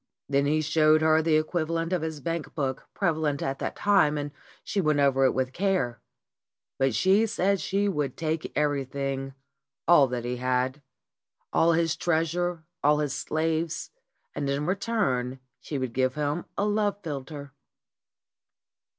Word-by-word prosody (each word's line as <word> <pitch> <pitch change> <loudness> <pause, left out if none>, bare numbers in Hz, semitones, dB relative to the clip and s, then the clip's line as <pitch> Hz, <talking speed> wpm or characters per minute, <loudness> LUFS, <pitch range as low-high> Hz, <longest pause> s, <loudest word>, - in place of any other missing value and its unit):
Then 140 0 +2
he 155 +2 +2
showed 155 0 +4
her 160 0 +4
the 160 -1 +2
equivalent 165 +2 0
of 180 - +1
his 160 -2 -4
bank 165 -1 -4
book 135 -3 -2
prevalent 160 -6 0
at 135 0 -2
that - - -3
time, 195 -7 +3
and 145 0 -3 0.3
she 200 - -1
went 155 -3 +2
over 135 -1 +4
it 130 - +4
with 130 0 -1
care. 175 - 0 0.8
But 135 -3 +2
she 200 +4 +4
said 200 -1 +1
that - - -12
she 195 +6 0
would 150 -9 -2
take 160 0 -2
everything, 135 -2 -1 0.5
all 155 -5 +7
that 120 -1 -4
he 125 0 -2
had; 130 +2 0 0.7
all 170 +1 +4
his 165 0 +1
treasure, 170 +1 0 0.2
all 150 +1 +5
his 150 -3 -1
slaves, 160 +2 -2 0.4
and 145 -1 -2
in 140 +2 -1
return 145 - -1 0.2
she 145 - -5
would 130 -3 -3
give 130 0 +1
him 150 +3 -1
a 200 - +1
love 210 -1 +1
philter. 145 -2 -6
150 Hz, 155 wpm, -27 LUFS, 135-170 Hz, 0.8 s, all